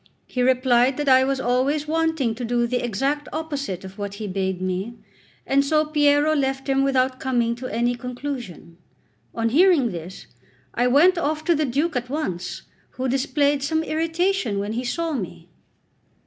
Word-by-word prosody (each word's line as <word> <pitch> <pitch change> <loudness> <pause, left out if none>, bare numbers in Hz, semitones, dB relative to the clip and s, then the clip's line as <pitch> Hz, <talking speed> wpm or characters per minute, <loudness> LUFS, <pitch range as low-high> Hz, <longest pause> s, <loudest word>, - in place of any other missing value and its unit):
He 250 - -3
replied 255 0 +3
that 295 -1 -2
I 260 -1 +6
was 270 0 0
always 265 +5 0
wanting 320 -6 0
to 240 +3 -7
do 240 0 +1
the 245 +1 -1
exact 270 +6 -1
opposite 285 - -4
of 190 +2 -11
what 200 -1 -4
he 215 +1 -6
bade 190 -1 -2
me; 185 +5 -3 0.5
and 275 +1 +3
so 305 +2 +2
Piero 295 0 +3
left 270 -1 -1
him 270 0 +2
without 260 -1 +1
coming 240 -3 0
to 255 +1 -6
any 240 +3 +1
conclusion. 245 - -7 0.6
On 230 0 0
hearing 300 - +4
this, 175 +1 -8 0.5
I 245 +1 +1
went 340 +8 +5
off 310 0 -2
to 340 - +4
the 310 -1 +1
Duke 290 +5 -1
at 245 0 -2
once, 220 - -4 0.3
who 260 +1 -3
displayed 280 +2 +1
some 315 +3 0
irritation 325 - 0
when 205 +2 -2
he 240 +2 -2
saw 330 +6 -2
me. 180 - -6
260 Hz, 170 wpm, -23 LUFS, 235-295 Hz, 0.6 s, I